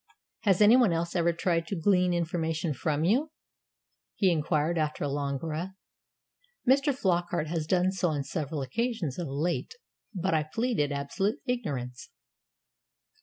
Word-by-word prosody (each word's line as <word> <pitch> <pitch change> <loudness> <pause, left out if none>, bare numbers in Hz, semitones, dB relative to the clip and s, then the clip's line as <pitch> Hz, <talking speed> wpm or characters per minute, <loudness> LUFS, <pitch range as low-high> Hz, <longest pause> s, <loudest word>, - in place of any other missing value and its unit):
"Has 195 -1 +4
anyone 225 0 +6
else 170 +1 -2
ever 170 -1 +3
tried 170 0 0
to 200 - -2
glean 180 0 +3
information 165 -2 -1
from 150 +3 -1
you?" 250 - +2 0.9
he 190 -3 +3
inquired, 155 0 +1
after 155 -2 -1
a - - 0
long 140 0 -2
breath. 165 +6 -4 0.9
"Mr. 275 +3 +4
Flockart 175 - 0
has 160 -2 -2
done 185 +1 +2
so 185 -2 0
on 145 -3 -1
several 150 -1 -3
occasions 185 - -2
of 170 - -3
late. 165 - -2 0.4
But 190 -3 -1
I 155 - +3
pleaded 155 - -1
absolute 145 +10 -1
ignorance." 140 - -3
170 Hz, 140 wpm, -28 LUFS, 150-195 Hz, 0.9 s, anyone